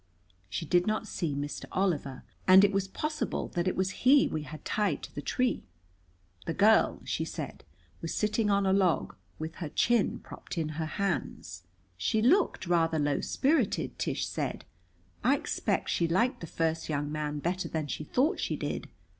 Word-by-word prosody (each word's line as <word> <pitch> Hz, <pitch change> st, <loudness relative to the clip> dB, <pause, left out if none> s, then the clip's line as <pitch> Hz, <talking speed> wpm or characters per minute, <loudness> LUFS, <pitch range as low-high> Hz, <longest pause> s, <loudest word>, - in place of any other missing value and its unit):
She 165 Hz, -, -3 dB
did 175 Hz, +3 st, +2 dB
not 215 Hz, 0 st, 0 dB
see 160 Hz, -7 st, -2 dB
Mr. 145 Hz, +1 st, -4 dB
Oliver, 155 Hz, -9 st, -1 dB, 0.2 s
and 190 Hz, +1 st, +9 dB
it 200 Hz, -, +5 dB
was 195 Hz, -1 st, 0 dB
possible 305 Hz, +9 st, -3 dB
that 175 Hz, +1 st, -1 dB
it 185 Hz, -, +1 dB
was 190 Hz, +1 st, 0 dB
he 275 Hz, +2 st, +6 dB
we 155 Hz, -, -3 dB
had 150 Hz, +1 st, -9 dB
tied 200 Hz, -9 st, 0 dB
to -, -, -8 dB
the 145 Hz, -, -5 dB
tree. 250 Hz, -, 0 dB, 0.9 s
The 165 Hz, -, -1 dB
girl, 215 Hz, +3 st, +4 dB
she -, -, -1 dB
said, -, -, -6 dB, 0.4 s
was 165 Hz, -, -3 dB
sitting 210 Hz, 0 st, +1 dB
on 200 Hz, -1 st, +3 dB
a 190 Hz, -, +3 dB
log, 190 Hz, -4 st, +2 dB, 0.2 s
with 160 Hz, +1 st, -6 dB
her 165 Hz, -4 st, -4 dB
chin 235 Hz, +6 st, +2 dB
propped -, -, -9 dB
in 160 Hz, -2 st, 0 dB
her 155 Hz, +1 st, -3 dB
hands. 95 Hz, -, -3 dB, 0.3 s
"She 95 Hz, -, +1 dB
looked 305 Hz, -, +3 dB
rather 165 Hz, -2 st, +2 dB
low 145 Hz, -2 st, +1 dB
spirited," 275 Hz, -6 st, +1 dB
Tish -, -, -1 dB
said. -, -, -3 dB, 0.6 s
"I -, -, +5 dB
expect -, -, -1 dB
she 170 Hz, -, +1 dB
liked 210 Hz, +10 st, +1 dB
the 165 Hz, -, -6 dB
first 160 Hz, +1 st, -1 dB
young 145 Hz, -1 st, -1 dB
man 150 Hz, -1 st, -2 dB
better 180 Hz, +5 st, -2 dB
than 160 Hz, -2 st, -2 dB
she 150 Hz, -, -4 dB
thought 275 Hz, -, +1 dB
she -, -, -1 dB
did. -, -, -4 dB
175 Hz, 180 wpm, -30 LUFS, 155-210 Hz, 0.9 s, and